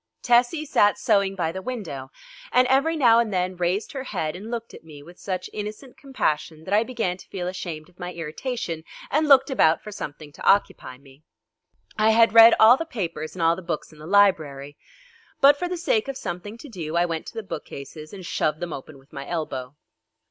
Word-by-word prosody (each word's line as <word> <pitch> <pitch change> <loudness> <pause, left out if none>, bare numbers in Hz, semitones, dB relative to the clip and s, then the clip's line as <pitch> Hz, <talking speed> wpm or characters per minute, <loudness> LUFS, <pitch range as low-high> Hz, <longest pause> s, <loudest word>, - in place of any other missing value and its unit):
Tessie 245 +6 +3
sat 205 -7 +3
sewing 195 -1 +1
by 170 -3 -1
the 190 - -6
window, 180 - -6 0.4
and 250 0 +4
every 275 +5 +3
now 235 -5 +5
and 230 -2 0
then 185 -1 -1
raised 180 +4 -1
her 265 -1 -6
head 160 -9 -3
and 205 +5 -8
looked 230 -1 -5
at - - -12
me 150 -3 -13
with 175 +3 -15
such 185 -2 -4
innocent 215 +5 -7
compassion 165 - -2
that 190 - -4
I 210 - +5
began 225 -7 -2
to - - -15
feel 180 -2 -4
ashamed 170 -4 -6
of 180 0 -26
my 180 0 -5
irritation 165 - -5 0.3
and 305 +2 +2
looked 270 -1 +6
about 165 -11 +3
for 210 - -8
something 150 -5 -8
to - - -13
occupy 160 -9 +1
me. 135 +1 -19 0.8
I 215 +1 +4
had 225 0 +5
read 230 0 +9
all 230 +4 +8
the 330 - -2
papers 175 - -5
and 175 - -2
all 165 +1 +4
the 185 - -8
books 170 -2 -5
in 150 - -17
the 155 - -10
library, 155 -8 +2 0.6
but 280 +1 +7
for 355 - -2
the 360 - -3
sake 275 -9 0
of 275 -1 -4
something 185 +3 -6
to 290 - -11
do 170 - -6
I 175 +1 +3
went 165 -2 -4
to - - -9
the 225 - -4
bookcases 155 -3 -8
and 190 -3 -9
shoved 155 -2 -1
them 175 -2 -4
open 140 +2 -9
with 135 +3 -23
my 140 -1 -7
elbow. 145 -6 -4
185 Hz, 215 wpm, -24 LUFS, 160-230 Hz, 0.8 s, read